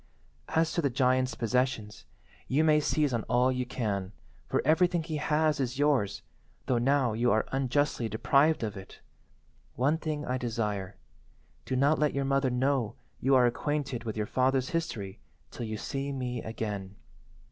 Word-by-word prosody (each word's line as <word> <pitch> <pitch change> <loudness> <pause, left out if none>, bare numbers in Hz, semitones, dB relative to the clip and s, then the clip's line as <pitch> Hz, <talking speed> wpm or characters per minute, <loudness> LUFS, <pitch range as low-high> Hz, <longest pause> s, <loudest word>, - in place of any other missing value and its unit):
"As 160 0 +2
to 170 - +1
the 140 - +1
giant's 130 -1 +1
possessions, 120 -2 -1 0.4
you 145 +5 +2
may 155 -1 +5
seize 150 -2 +1
on 115 - 0
all 125 +1 +3
you 125 -1 -2
can, 100 -6 -3 0.3
for - - 0
everything 170 +2 +3
he 155 -1 -3
has 155 0 +1
is 130 -1 -2
yours 135 -9 +1 0.4
though 125 -2 +1
now 130 -1 +2
you 120 +2 +2
are 110 - +2
unjustly 135 -2 0
deprived 140 +7 +3
of 105 -2 -3
it. 95 -1 -11 0.8
One 145 +6 +1
thing 150 -2 -3
I 130 +1 -1
desire. 105 -5 -2 0.7
Do - - -2
not 140 +4 +3
let 150 -2 +1
your 140 0 0
mother 135 -1 +2
know 125 -2 0 0.2
you 135 +1 +3
are 125 -1 +6
acquainted 130 0 -1
with 110 -2 -4
your 105 - 0
father's 130 +2 +1
history 115 - -3 0.3
till 120 - -5
you 110 0 -4
see 135 +6 -3
me 125 -3 -3
again. 105 -3 -5
130 Hz, 165 wpm, -29 LUFS, 115-145 Hz, 0.8 s, are